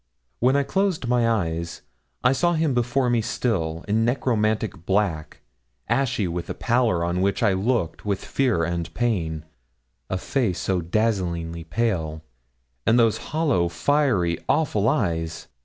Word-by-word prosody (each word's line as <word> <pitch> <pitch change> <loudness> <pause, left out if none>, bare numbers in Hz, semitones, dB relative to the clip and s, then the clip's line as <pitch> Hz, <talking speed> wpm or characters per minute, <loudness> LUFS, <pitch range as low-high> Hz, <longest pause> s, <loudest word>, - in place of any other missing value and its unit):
When 130 +3 +3
I 140 - +3
closed 190 -4 0
my 120 -1 +2
eyes 85 -6 -2 0.4
I 125 - +5
saw 175 +6 +2
him 160 -4 +1
before 125 +2 +1
me 120 -1 +2
still, 85 -8 -2
in 110 +2 +2
necromantic 110 -6 0
black, 95 -6 0 0.5
ashy 120 -4 +1
with 85 0 -4
a - - -3
pallor 115 -8 +1
on 90 +1 -1
which 100 +4 +1
I 105 -3 +4
looked 95 -3 -1
with 100 -2 -2
fear 125 -11 +1
and 85 0 -2
pain, 85 -10 -1 0.6
a 95 - -1
face 105 -3 -1
so 95 0 0
dazzlingly 85 -4 -1
pale, 80 -6 -1 0.6
and 115 - +4
those 115 -2 +3
hollow, 140 - +1
fiery, 95 - +1
awful 115 -9 +2
eyes! 85 - -1
105 Hz, 140 wpm, -24 LUFS, 85-125 Hz, 0.6 s, I